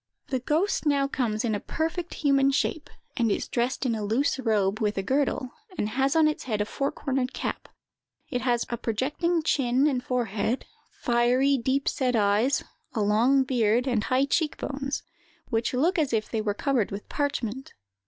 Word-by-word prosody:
"The 260 - 0
ghost 320 +6 0
now 280 -1 +3
comes 235 -5 -1
in 225 - 0
a 205 - -1
perfect 330 - -3
human 275 -2 +3
shape, 290 +2 -1 0.3
and 235 -5 +1
is - - -1
dressed 245 +3 -1
in 245 - +1
a 215 -1 -3
loose 260 +7 +1
robe, 215 -4 +1
with 210 -2 0
a 195 - 0
girdle, 260 +1 0 0.3
and 210 - 0
has 270 +5 +1
on 320 -1 +5
its 305 - -2
head 215 -5 -1
a 210 - +1
four 275 +5 -2
cornered 265 -2 -2
cap. - - -4 0.6
It 250 -4 -2
has 240 -2 +1
a 235 - -2
projecting 295 +10 0
chin 265 -3 +2
and 260 -4 +1
forehead, 235 -1 -1 0.4
fiery, 250 +3 +3
deep 265 +2 0
set 250 -2 +1
eyes, 210 +5 +2 0.3
a 220 - +1
long 235 +7 +4
beard, 240 -2 +2
and 235 -5 +1
high 260 +2 +2
cheek 300 +2 0
bones, 275 0 -3 0.5
which 225 -1 0
look 325 +9 +2
as 290 -6 0
if 215 -1 -1
they 225 - 0
were 205 -1 -1
covered 260 -4 +1
with 200 +1 -7
parchment. 265 -3 -3
255 Hz, 185 wpm, -26 LUFS, 225-275 Hz, 0.6 s, on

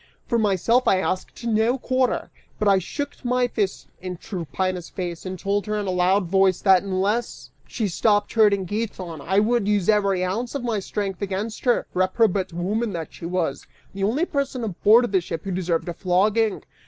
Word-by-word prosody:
For 235 - +1
myself 220 +4 +2
I 190 - +5
asked 185 +5 -3
no 230 +2 +2
quarter, 255 0 0 0.3
but 210 - 0
I 195 -1 +5
shook 285 - -6
my 250 0 +1
fists 205 -5 -2 0.2
in 180 -1 -5
Tryphaena's 185 0 -3
face, 175 -1 -5
and 185 0 -5
told 200 +3 -1
her 210 0 -1
in 205 - -2
a 190 - -1
loud 185 +2 +2
voice 190 0 +3
that 190 -2 +5
unless 200 +4 -2 0.2
she 220 -5 -2
stopped 205 +3 +1
hurting 205 -4 +4
Giton, 185 -6 -4
I 190 +7 -1
would 220 0 +1
use 205 -3 +1
every 200 -3 +2
ounce 230 +8 -3
of 275 - -3
my 230 -4 0
strength 195 0 -4
against 200 +4 -4
her, 245 - +2
reprobate 185 +1 +1
woman 205 +6 -2
that 165 -2 -5
she 165 - -7
was, 170 -5 -2 0.3
the 195 0 -4
only 250 - +1
person 275 -6 -2
aboard 220 +3 +4
the 190 -2 +3
ship 165 -1 -5
who 195 - -4
deserved 175 -2 -1
a 175 - -3
flogging. 205 +5 +1
200 Hz, 185 wpm, -23 LUFS, 185-225 Hz, 0.3 s, I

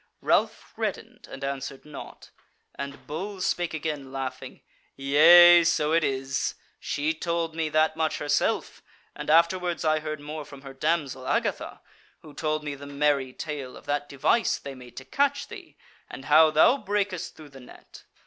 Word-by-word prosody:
Ralph - - 0
reddened - - -5
and 135 - -9
answered 135 0 -5
naught; 150 -2 -11 0.4
and 140 0 -8
Bull 190 +6 -6
spake 175 -2 -1
again, 150 -3 -4
laughing: 135 -1 -6 0.3
"Yea, 170 +5 +7
so 155 -2 +1
it 165 0 +3
is: 135 -1 -2 0.2
she 150 +2 -1
told 170 0 -2
me 160 -1 -2
that 155 +1 +2
much 160 -1 -1
herself, 145 - -1 0.3
and - - -7
afterwards 170 +2 +2
I 155 0 +2
heard 155 -1 -5
more 150 +1 -7
from 140 -1 -13
her 135 -1 -9
damsel 140 -3 -2
Agatha, - - -2 0.4
who 155 -2 -13
told 155 0 -2
me 150 -1 -4
the 140 0 -10
merry 140 -2 0
tale 140 -2 -6
of - - -15
that 145 0 -2
device 140 - +1
they 140 - -8
made 125 -2 -14
to 130 - -8
catch 280 - 0
thee, 395 -6 -12 0.3
and 135 - -9
how 155 +1 +6
thou 155 - +5
brakest 205 - -3
through 155 -2 -13
the 135 -1 -14
net. 125 - -15
150 Hz, 165 wpm, -26 LUFS, 140-165 Hz, 0.4 s, Yea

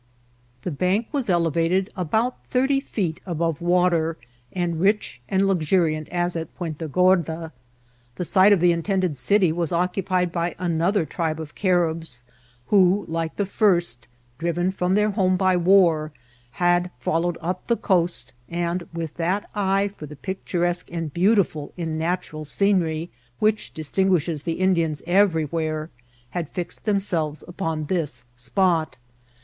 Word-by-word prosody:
The 180 - -2
bank 185 +9 0
was 275 -7 -2
elevated 170 +3 +1
about 220 +8 -1
thirty 270 +2 +2
feet 190 - -3
above 165 -3 -2
the 170 - -7
water, 175 -2 +2 0.3
and 175 -3 -2
rich 200 - +1
and 195 0 +2
luxuriant 160 -3 +1
as 175 0 -1
at 165 -1 -4
Puenta 165 -3 -5
Gorda. 165 -1 +2 0.6
The 180 - -3
site 190 +3 +5
of 200 -5 +4
the 175 0 +5
intended 180 -1 0
city 180 +7 +3
was 170 -1 -2
occupied 180 0 0
by 170 0 -2
another 175 +2 +1
tribe 160 +1 -2
of 155 -2 -7
Caribs, 165 - 0 0.5
who, 195 0 +4
like 165 0 -3
the 200 - 0
first, 175 - +1 0.3
driven 170 +2 0
from 185 0 0
their 210 +1 +3
home 185 -2 +2
by 185 -1 +3
war, 170 -4 +4 0.4
had 175 0 +2
followed 165 +6 0
up 180 +2 -4
the 235 - +2
coast, 170 - 0 0.2
and, 170 +1 -2
with 165 -2 -5
that 180 +5 -1
eye 195 -1 +1
for 150 - -8
the 150 - -10
picturesque 175 +1 -2
and 165 -4 -4
beautiful 180 -6 +1
in 160 -2 -3
natural 165 -2 -2
scenery 170 -1 0 0.3
which 215 0 +1
distinguishes 165 -1 0
the 165 +2 -2
Indians 170 -5 +1
everywhere, 160 -4 +1 0.4
had 170 -4 -3
fixed 180 +2 -6
themselves 175 -8 0
upon 165 -4 -3
this 155 -6 -1
spot. 160 +3 +1
175 Hz, 140 wpm, -23 LUFS, 160-190 Hz, 0.6 s, site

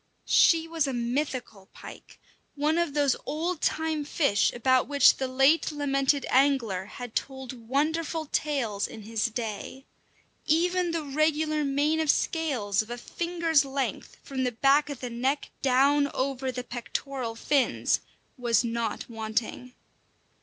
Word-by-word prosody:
She 330 -1 +4
was 325 -3 0
a 270 - -2
mythical 245 -4 -3
pike, - - -12 0.4
one 305 +3 +1
of 335 -4 -1
those 285 -3 +3
old 325 +3 -2
time 315 -1 0
fish 280 - +2
about 255 +1 +2
which 285 -2 +5
the 265 - -2
late 270 +6 +3
lamented 280 -1 +1
angler 250 -9 +2
had 245 +2 -9
told 260 -4 -5
wonderful 315 +3 0
tales 270 -9 -1
in 220 - -10
his 225 +2 -1
day. 230 +3 -6 0.6
Even 355 +2 +2
the 330 -1 -2
regular 305 +1 0
mane 290 +3 +1
of 315 -2 0
scales 255 - +1
of 215 - -10
a 240 - -4
finger's 335 +2 0
length, 270 0 -4
from 265 -1 -3
the 250 -1 -1
back 280 +5 +3
of 285 -3 -6
the 250 - -4
neck 260 +5 -1
down 280 +2 +3
over 265 0 -1
the 250 0 -5
pectoral 245 0 -5
fins, 275 +3 +1 0.4
was 235 -3 +2
not 230 -2 -3
wanting. 225 +2 -4
275 Hz, 140 wpm, -27 LUFS, 240-300 Hz, 0.6 s, which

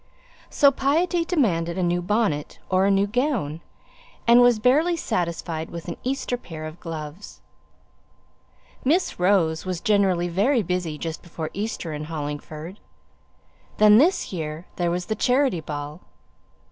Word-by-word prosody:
So 280 -2 +5
piety 330 +6 +1
demanded 185 - 0
a 185 - 0
new 175 0 +1
bonnet, 180 -6 -1
or 185 +1 +3
a - - +3
new 195 0 +3
gown; 210 - -1 0.6
and 235 +1 +7
was 245 -2 +5
barely 300 +10 +3
satisfied 170 - -3
with 170 0 -8
an 170 - -4
Easter 260 -1 -2
pair 160 -9 -8
of 155 +2 -8
gloves. 160 +3 -8 1.4
Miss 325 - +1
Rose 175 -4 +2
was 185 -2 -3
generally 195 -5 +2
very 215 +8 +2
busy 180 -3 -2
just 160 +1 -5
before 165 -2 -6
Easter 200 -5 -4
in 150 0 -5
Hollingford. 155 +3 -6 1.0
Then 210 +1 +7
this 340 - +2
year 160 0 -5
there 175 -1 +1
was 180 +1 -2
the 220 - -1
charity 250 -2 +2
ball. 150 +2 -6
180 Hz, 140 wpm, -24 LUFS, 165-240 Hz, 1.4 s, and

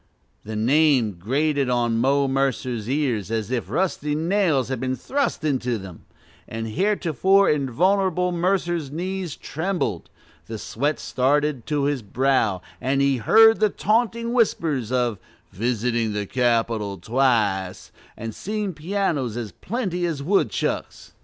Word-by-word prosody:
The 110 +1 -6
name 130 0 +3
grated 140 - 0
on 120 -2 +1
Mo 140 +3 +2
Mercer's 130 -4 -1
ears 130 -8 0
as 110 0 -2
if 120 -7 -2
rusty 150 - -1
nails 165 -5 +1
had 130 -3 -2
been 130 +1 -1
thrust 275 - -2
into 125 -5 0
them; 95 -4 -11 0.4
the 115 0 -4
heretofore 195 - +2
invulnerable 180 +6 +1
Mercer's 175 -3 0
knees 180 +1 -4
trembled, 160 - -3 0.4
the 110 - -5
sweat 145 +8 -2
started 140 0 0
to 150 -2 0
his 140 -2 0
brow, 110 -3 +1 0.2
as 135 +2 0
he 140 -1 +2
heard 225 - +6
the 215 -1 +4
taunting 230 +3 0
whispers 155 - +1
of 120 -5 0 0.3
"visiting 115 +1 -1
the 105 0 -2
Capitol 115 -3 0
twice" 105 -4 0 0.3
and 115 0 -5
seeing 210 - -3
pianos 155 - -2
as 115 -4 -5
plenty 185 - -3
as 150 -4 -3
woodchucks. 195 +6 -1
135 Hz, 130 wpm, -23 LUFS, 115-175 Hz, 0.4 s, heard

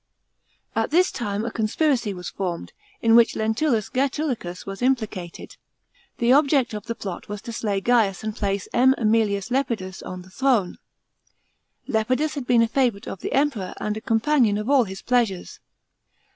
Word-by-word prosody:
* - - -42
At - - 0
this 355 +4 +3
time 210 -2 -3
a 235 - -3
conspiracy 235 +1 0
was 180 -2 -6
formed, 180 -3 -4 0.3
in 225 0 +5
which 235 -1 +5
Lentulus 220 +1 0
Gsetulicus 255 - -2
was 195 +2 -7
implicated. 220 -9 -2 0.6
The 240 +1 +3
object 275 -4 +3
of 210 +1 -6
the 230 - -3
plot 190 -3 -7
was 205 0 -4
to 235 - -6
slay 205 -3 -1
Gaius 220 -4 +2
and 215 -1 -3
place 200 -3 -2
M. 260 +2 +5
.ZEmilius 215 -2 +1
Lepidus 230 -8 -2
on 185 0 -7
the 185 - -17
throne. 240 -6 +1 1.1
Lepidus 255 +7 0
had 275 -4 -5
been 240 -2 +5
a - - +2
favourite 235 -4 0
of 195 - -6
the - - -5
Emperor 265 -9 0
and 210 0 -2
a 220 - -6
companion 230 -1 +2
of 215 +6 -2
all 265 -4 +5
his 190 -1 -8
pleasures. 230 -7 0
225 Hz, 170 wpm, -23 LUFS, 200-255 Hz, 1.1 s, in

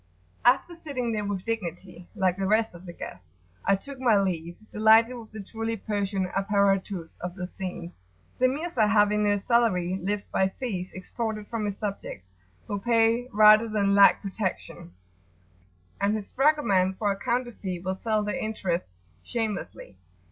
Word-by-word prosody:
After 260 +8 +3
sitting 275 -8 -3
there 210 -2 -1
with 200 -2 -3
dignity, 180 -5 -5
like 190 -4 +2
the 195 0 -2
rest 220 +1 +2
of 175 +2 -12
the - - -6
guests, 90 - -10 0.3
I 195 - +3
took 270 +7 -9
my 235 -5 +4
leave, 175 -3 -2 0.2
delighted 220 +3 +5
with 230 -3 -10
the 215 -2 -7
truly 225 +2 -4
Persian 200 -2 -2
[p.88]"apparatus" 195 -2 0
of 180 0 -5
the 180 -2 -4
scene. 180 -2 -6 0.5
The 255 - +5
Mirza, 270 -5 0
having 210 0 +3
no 205 0 +3
salary, 195 -5 +1
lives 200 +2 -1
by 190 - +1
fees 190 -4 -5
extorted 215 +2 -4
from 225 -3 -2
his 200 -1 -4
subjects, 195 - -5 0.4
who 205 - -3
pay 230 +2 +2
rather 215 +2 +7
than 200 -2 +1
lack 200 +1 +6
protection; 190 - -4 1.1
and 200 +2 +2
his 210 -2 -6
dragoman 250 -11 +2
for 205 +1 0
a - - -1
counter 240 +2 -1
fee 185 -5 -5
will 185 +2 -2
sell 215 -2 0
their 210 - -2
interests 175 - -3 0.2
shamelessly. 210 - -4
205 Hz, 160 wpm, -26 LUFS, 190-225 Hz, 1.1 s, rather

